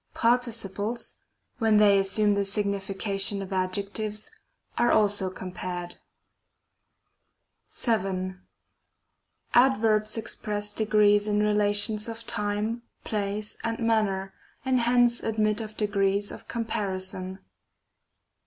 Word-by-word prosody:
Participles, 230 -2 0 0.4
when 220 -2 +4
they 205 -1 +6
assume 205 +2 +2
the 200 0 +1
signification 200 0 0
of 195 0 -7
adjectives, 200 +3 -2 0.4
are 240 - +3
also 205 -3 +3
compared. 180 -1 -6 1.9
Y. 190 -4 0 1.2
Adverbs 220 -4 +3
express 210 -2 -4
degrees 210 -1 +3
in 210 0 +2
relations 210 +1 +2
of 230 0 -7
time, 210 +3 -1 0.2
place, 210 0 -3
and 230 0 -1
manner, 210 -4 0 0.3
and 260 -1 +2
hence 240 0 +3
admit 215 0 0
of 215 -1 -8
degrees 200 -1 +1
of - - -11
com 235 -1 -3
parison. 190 -3 -3
210 Hz, 95 wpm, -27 LUFS, 195-220 Hz, 1.9 s, they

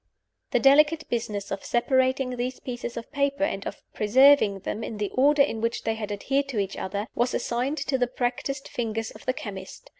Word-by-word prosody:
The - - +2
delicate 300 +3 +5
business 210 -4 -3
of 195 - -4
separating 260 +1 +1
these 250 +1 -3
pieces 240 -2 -6
of 230 - -7
paper, 280 0 0
and 195 -9 -1
of - - -8
preserving 220 -2 +5
them 215 +3 -4
in 220 - -5
the 205 -1 -2
order 285 +2 +5
in 225 -5 -2
which 230 +1 -1
they 225 - 0
had 215 -2 -5
adhered 270 +7 0
to 260 -5 -5
each 195 -1 -1
other, 200 +2 -3
was 245 +1 0
assigned 250 +5 -1
to 265 -2 0
the 245 - +2
practiced 255 +3 -3
fingers 225 -2 -3
of 215 - -15
the 255 - +2
chemist. 205 - -8
245 Hz, 200 wpm, -26 LUFS, 215-275 Hz, -, delicate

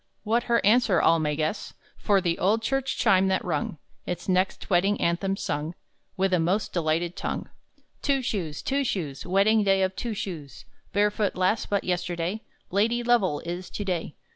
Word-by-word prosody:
What 230 +2 +1
her 235 -3 +3
answer, 215 -4 +4
all 165 0 +4
may 150 -1 0
guess, 155 +7 -3 0.2
For 200 -2 +2
the 170 -2 -1
old 215 +5 +2
church 270 +2 -1
chime 190 0 +4
that 190 0 0
rung 160 -2 -2 0.3
Its 175 -1 -4
next 185 0 0
wedding 195 +2 +2
anthem 190 +3 0
sung 150 +1 -3 0.4
With 190 0 +1
a 180 - +4
most 185 +6 0
delighted 170 +1 0
tongue: - - -4 0.5
_"Two 275 -2 +1
Shoes, 170 -10 -3
Two 275 +1 0
Shoes, 160 - -3
Wedding 205 +4 +4
day 195 -1 +3
of 190 0 -1
Two 235 -3 -3
Shoes! 170 -9 -6 0.3
Barefoot 205 0 +1
lass 185 +5 +1
but 200 -1 0
yesterday, 180 +2 -2 0.3
Lady 230 +5 +1
Lovell 220 -11 +2
is 175 +2 -5
to 205 - -5
day! 175 -5 -2
190 Hz, 170 wpm, -26 LUFS, 170-210 Hz, 0.5 s, answer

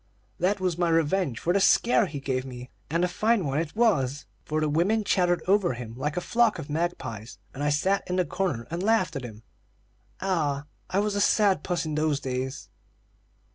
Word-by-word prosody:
That 190 +4 +1
was 180 -2 -1
my 175 -1 +2
revenge 165 -4 +1
for 175 - 0
the 200 - +3
scare 230 +2 +4
he 150 -4 -6
gave 130 -2 -2
me, 125 -1 -9 0.2
and 170 +4 +1
a - - +1
fine 210 +2 +1
one 140 +1 0
it 165 +2 -4
was; 150 - +1 0.2
for 155 0 -2
the 155 - +1
women 180 +9 +2
chattered 175 -3 +1
over 195 -5 +3
him 120 -2 -7
like 150 +6 -3
a - - 0
flock 230 -4 +3
of 155 -3 -7
magpies, 130 - -3 0.2
and 135 - -7
I 145 - +2
sat 185 +8 +1
in 180 - 0
the 180 -1 +2
corner 155 -13 -2
and 170 +1 -2
laughed 200 -6 +2
at 135 - -4
him. 110 -2 -9 0.8
Ah, 150 -7 -1 0.2
I 185 - -1
was 210 +1 +1
a 205 - 0
sad 200 -6 +3
puss 175 -1 -2
in 155 - -3
those 150 -1 +1
days!" 130 0 -4
165 Hz, 205 wpm, -26 LUFS, 140-190 Hz, 0.8 s, scare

